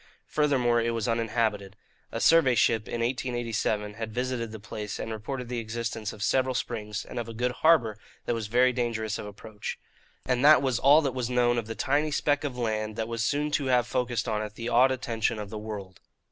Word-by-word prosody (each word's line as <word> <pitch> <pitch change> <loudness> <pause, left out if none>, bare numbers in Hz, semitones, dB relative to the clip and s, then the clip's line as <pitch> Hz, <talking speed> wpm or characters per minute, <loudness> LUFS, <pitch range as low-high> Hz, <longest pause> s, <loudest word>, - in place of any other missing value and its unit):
Furthermore, 130 -6 +2
it 115 0 0
was 115 0 -2
uninhabited. 110 -4 -1 0.4
A - - -3
survey 160 -7 +5
ship, 110 -2 +2
in 115 - -3
1887, 115 -4 -1
had 110 +1 -5
visited 125 -1 -2
the 110 - -8
place 105 0 -6
and 115 - -5
reported 120 +4 -5
the 120 0 -3
existence 110 -1 -4
of 105 - -7
several 130 +2 +1
springs 105 -4 -3
and - - -6
of 115 -1 -5
a 115 - -8
good 125 +2 0
harbour 125 -7 +3 0.3
that - - 0
was 115 -2 -3
very 125 +3 +3
dangerous 115 -3 -2
of - - -6
approach. 105 +1 -7 0.5
And 125 0 +1
that 150 0 +7
was 130 -3 +1
all 145 +4 +6
that 135 -3 -1
was 125 -2 -2
known 120 -1 +2
of 110 - -6
the 115 - -5
tiny 145 +7 +1
speck 145 0 +1
of 135 -4 -4
land 110 -2 -2
that 110 0 -2
was 115 0 -2
soon 145 +5 0
to 145 -1 0
have 125 -2 +3
focussed 120 -2 -1
on 110 -1 0
it 105 0 -6
the 115 +1 -4
awed 125 +3 +5
attention 115 -3 -1
of 105 -1 -6
the 110 - -5
world. 100 -4 -7
115 Hz, 215 wpm, -27 LUFS, 110-125 Hz, 0.5 s, that